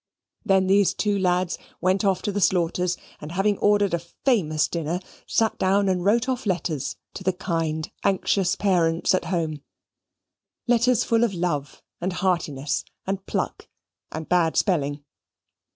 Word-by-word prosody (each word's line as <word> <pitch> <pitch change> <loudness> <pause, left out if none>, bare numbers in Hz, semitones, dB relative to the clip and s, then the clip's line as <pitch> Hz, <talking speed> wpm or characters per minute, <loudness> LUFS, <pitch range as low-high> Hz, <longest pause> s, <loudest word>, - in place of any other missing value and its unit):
Then 190 -1 +3
these 195 +1 +3
two 205 -1 0
lads 180 -1 +1 0.2
went 185 +3 +1
off 195 -2 +1
to 205 - -1
the 200 +1 -2
Slaughters', 180 0 +1 0.2
and 150 +2 -8
having 200 +2 +1
ordered 205 -2 +3
a 170 - +2
famous 170 - 0
dinner, 170 +1 -2 0.3
sate 225 -1 +1
down 195 +1 +2
and 185 -2 +1
wrote 230 +5 +3
off 255 -3 -2
letters 165 -6 -1 0.2
to 185 - -7
the 185 - +2
kind 165 -4 -2
anxious 195 -1 +2
parents 170 -5 +2
at 185 - +1
home 165 -4 -2 1.0
letters 240 0 +3
full 230 0 +2
of 215 -5 0
love 170 -5 -2 0.2
and 185 +1 -1
heartiness, 150 -8 -1 0.2
and 195 0 -3
pluck - - -3 0.4
and 160 0 -5
bad 170 -3 +2
spelling. 145 -6 0
185 Hz, 150 wpm, -24 LUFS, 165-200 Hz, 1.0 s, Then